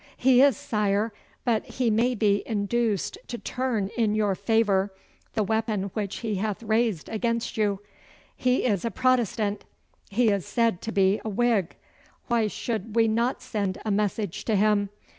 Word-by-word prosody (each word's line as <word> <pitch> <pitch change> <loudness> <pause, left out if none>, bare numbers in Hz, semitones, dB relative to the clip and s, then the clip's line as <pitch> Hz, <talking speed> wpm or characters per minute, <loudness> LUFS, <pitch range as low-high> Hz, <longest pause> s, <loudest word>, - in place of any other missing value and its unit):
'He 255 0 +5
is, 275 -6 +5
sire, 210 0 0 0.3
but 230 -3 +2
he 245 -3 -1
may 240 +4 +2
be 205 -2 +2
induced 215 -1 -1
to 240 - -5
turn 235 -6 -2
in 220 -3 +1
your 210 -2 +2
favour 200 -1 +1 0.4
the 215 - +2
weapon 215 -2 -1
which 205 -3 -3
he 220 -4 -2
hath 210 +2 -2
raised 220 -6 0
against 230 +1 -2
you. 205 -2 0 0.5
He 255 0 +1
is 205 -7 +1
a 230 - 0
Protestant. 230 -5 +1 0.5
He 230 +3 +3
is 200 -3 +1
said 230 -6 0
to 225 - -4
be 195 0 +2
a 220 - -3
Whig. 215 -4 +1 0.5
Why 230 -2 +2
should 220 0 -4
we 225 -1 +4
not 235 +4 0
send 200 -3 -2
a 215 - 0
message 205 -2 -1
to 220 - +1
him? 205 0 +2
215 Hz, 160 wpm, -26 LUFS, 200-230 Hz, 0.5 s, He